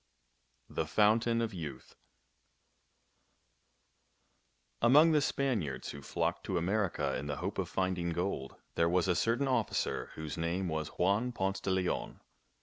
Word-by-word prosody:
THE 80 - -3
FOUNTAIN 115 +5 +3
OF 110 -2 -3
YOUTH 80 -6 -7 2.9
Among 150 +8 +7
the 150 -2 +4
Spaniards 105 - -1
who 70 - -9
flocked - - -2
to 95 - -1
America 95 +2 0
in 70 - -4
the 75 - -2
hope - - -3
of - - -2
finding 95 -2 -1
gold, 85 -5 -2 0.2
there 85 0 +2
was 90 +1 +2
a 90 - +3
certain 115 +9 +1
officer 125 -4 0
whose 80 0 -5
name 85 +3 -1
was 80 -1 -2
Juan 100 +10 +1
Ponce 95 -4 -1
de - - -3
Leon. 95 -1 -1
95 Hz, 140 wpm, -32 LUFS, 85-115 Hz, 2.9 s, Among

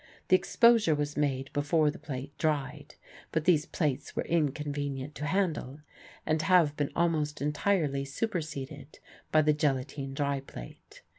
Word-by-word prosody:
The 185 - +7
exposure 220 -2 +4
was 145 0 -2
made 135 -2 -1
before 150 +1 +2
the - - -11
plate 145 -1 -6
dried; 150 -4 -2 0.4
but 160 -1 -1
these 155 -4 +3
plates 150 -6 -2
were - - -1
inconvenient 145 -3 -1
to 150 - -4
handle 155 -6 -1 0.4
and 155 0 +1
have 165 -4 +4
been 145 -1 -1
almost 155 -4 0
entirely 150 -1 0
superseded 150 -4 -4 0.3
by 155 0 +5
the 150 0 +4
gelatine 135 -1 -1
dry 140 -1 0
plate. 60 - -12
150 Hz, 140 wpm, -30 LUFS, 140-160 Hz, 0.4 s, The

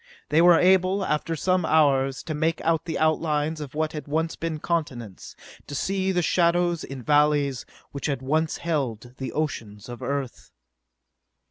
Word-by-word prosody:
They 160 - +4
were 175 -1 +7
able, 190 +2 +3
after 150 +2 -1
some 185 +3 +1
hours, 135 -4 +2
to 155 - -4
make 160 +2 0
out 165 0 +1
the 165 - -3
outlines 155 0 0
of 145 -1 -8
what 155 0 -1
had 150 -1 -6
once 160 +3 -1
been 165 -1 -3
continents, 135 - -4 0.3
to 145 - -6
see 190 +6 0
the 180 -2 +1
shadows 175 0 +2
in 135 -2 -8
valleys 145 -2 +2 0.2
which 140 - -4
had 140 -3 -2
once 155 +4 0
held 125 -8 -3
the 130 - -5
oceans 115 -9 -4
of 120 -1 -8
Earth.... 140 -3 -4
155 Hz, 160 wpm, -25 LUFS, 140-165 Hz, 0.3 s, were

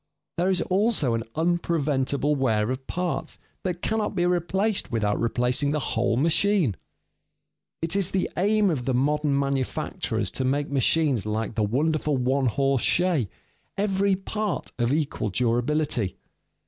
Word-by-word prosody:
There 180 +2 +2
is 185 -2 +2
also 190 - +1
an 115 - 0
unpreventable 150 -4 +1
wear 115 -4 +1
of 130 +1 -5
parts 180 0 -3 0.2
that 180 -2 -4
cannot 215 -2 -1
be 175 -1 +1
replaced 185 +4 0
without 105 -3 0
replacing 125 +4 +1
the 150 +1 0
whole 115 0 +1
machine. 165 - +2 1.1
It 165 +3 -1
is 195 -2 +1
the 190 -2 0
aim 205 +1 +3
of 130 -6 -2
the 130 - 0
modern 145 +2 +1
manufacturers 140 -2 -2
to 130 - -3
make 140 +3 0
machines 135 - +1
like 110 +1 -2
the 110 - -1
wonderful 150 +6 +1
one 130 +1 +1
horse 135 +1 +1
shay, 170 - +2 0.5
every 200 -1 +2
part 210 +1 -3
of 120 +1 +1
equal 145 -7 -1
durability. 120 0 0
145 Hz, 140 wpm, -25 LUFS, 125-180 Hz, 1.1 s, aim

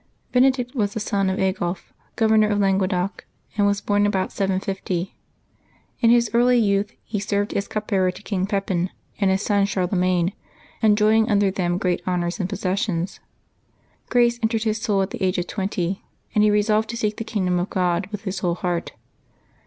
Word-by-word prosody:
©ENEDICT 250 -1 +3
was 210 -6 -1
the - - -1
son 200 -2 0
of 190 - -1
Aigulf, 185 -2 -2 0.2
Governor 220 -2 +4
of 205 - +1
Langue 195 -1 +2
doc, 185 +1 -2 0.3
and 205 -1 +3
was 200 0 +1
born 205 0 +2
about 190 -2 -1
750. 190 -2 -2 0.8
In 230 - +4
his 235 -1 +4
early 245 +1 +4
youth 205 -2 +2
he 210 -2 -3
served 205 +1 -1
as 200 - -1
cup 215 0 -4
bearer 190 -3 +2
to 185 - -8
King 195 -3 -1
Pepin 195 -3 -1 0.3
and 195 -2 +3
his 190 +1 +1
son 200 -1 +2
Charle 185 -3 0
magne, 180 -1 +2 0.5
enjoying 215 +1 +4
under 205 -2 +3
them 175 -2 -1
great 180 -2 0
honors 175 +1 -1
and 185 -1 -1
possessions. 185 -2 -2 0.9
Grace 240 -1 +3
entered 220 -1 0
his 220 -1 -1
soul 200 -4 +1
at 190 - -5
the - - -7
age 185 0 +1
of 175 - -1
twenty, 190 -1 -2 0.3
and 210 - +4
he 210 - +5
re 210 0 +3
solved 215 +1 +1
to 235 - -4
seek 210 -2 -1
the - - -3
kingdom 185 -5 0
of 180 - -2
God 180 -1 0
with 210 -2 -6
his 195 -2 -3
whole 175 -2 0
heart. 175 -1 -3
200 Hz, 190 wpm, -23 LUFS, 185-215 Hz, 0.9 s, he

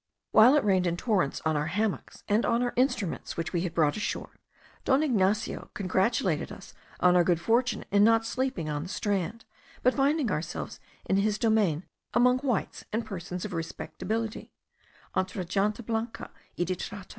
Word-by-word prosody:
While 245 +6 +7
it 295 - +3
rained 190 -3 +3
in 170 0 -1
torrents 190 - 0
on 160 -1 +2
our 150 +1 0
hammocks 205 +4 -2
and 210 +3 +2
on 235 +1 +2
our 245 - -1
instruments 240 - -1
which 165 +2 -3
we 170 - +1
had 180 -2 -3
brought 150 -3 +3
ashore, 215 - -4 0.4
Don 270 +3 +3
Ignacio 215 -5 0
congratulated 190 -3 0
us - - -11 0.3
on 180 0 +5
our 175 - +6
good 170 -1 +2
fortune 235 +7 +1
in 200 0 +5
not 225 +1 +4
sleeping 245 -8 -2
on 150 -1 -2
the 175 - -7
strand, 205 +3 -2 0.4
but 255 - +4
finding 285 -2 +2
ourselves 155 +2 -4 0.3
in 195 - +2
his 210 +1 +1
domain, 210 -9 +2 0.3
among 250 +1 +5
whites 255 -7 -2
and 225 +2 -1
persons 180 -2 -5
of - - -5
respectability 215 +6 -4 0.6
(entre 185 0 -1
gente 205 +6 0
blanca 225 +1 -3 0.3
y - - +1
de 185 +1 -1
trato). 195 +2 -7
205 Hz, 170 wpm, -28 LUFS, 180-230 Hz, 0.6 s, While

